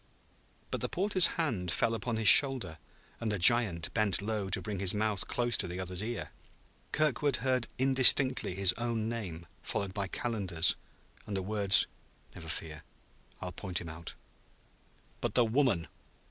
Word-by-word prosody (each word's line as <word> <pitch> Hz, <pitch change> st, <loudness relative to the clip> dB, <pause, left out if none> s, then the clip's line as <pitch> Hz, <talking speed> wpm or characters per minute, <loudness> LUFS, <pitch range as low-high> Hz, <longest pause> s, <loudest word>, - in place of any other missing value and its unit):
But -, -, -4 dB
the -, -, -3 dB
porter's 185 Hz, -1 st, +4 dB
hand 115 Hz, -, -3 dB
fell 115 Hz, +7 st, 0 dB
upon 115 Hz, +1 st, -4 dB
his 110 Hz, -1 st, 0 dB
shoulder 115 Hz, -, +6 dB, 0.4 s
and 110 Hz, -2 st, -3 dB
the 105 Hz, -, -2 dB
giant 95 Hz, -4 st, +3 dB
bent 110 Hz, -4 st, +1 dB
low 105 Hz, -1 st, -4 dB
to 95 Hz, -, +2 dB
bring 105 Hz, -3 st, -6 dB
his 95 Hz, +1 st, +2 dB
mouth 105 Hz, -2 st, -2 dB
close 120 Hz, -2 st, -2 dB
to -, -, -2 dB
the 90 Hz, +1 st, -7 dB
other's 90 Hz, 0 st, -4 dB
ear. 110 Hz, -7 st, -6 dB, 0.6 s
Kirkwood 145 Hz, -2 st, 0 dB
heard 130 Hz, 0 st, -2 dB
indistinctly 130 Hz, -4 st, +4 dB
his 95 Hz, -2 st, +3 dB
own 115 Hz, -2 st, -3 dB
name 95 Hz, -8 st, -7 dB, 0.2 s
followed 100 Hz, -2 st, -4 dB
by 100 Hz, -1 st, -4 dB
Calendar's, 95 Hz, -7 st, -1 dB, 0.5 s
and 100 Hz, -, -4 dB
the 95 Hz, -, -4 dB
words: 100 Hz, -1 st, +5 dB, 0.5 s
"Never 80 Hz, -2 st, -12 dB
fear. 80 Hz, -1 st, -5 dB, 0.6 s
I'll 90 Hz, -, -5 dB
point 90 Hz, 0 st, -5 dB
him 85 Hz, -, -9 dB
out." 80 Hz, +1 st, -9 dB, 1.1 s
"But -, -, -4 dB
the 120 Hz, -, +4 dB
woman?" 115 Hz, -, 0 dB
105 Hz, 160 wpm, -29 LUFS, 90-120 Hz, 1.1 s, shoulder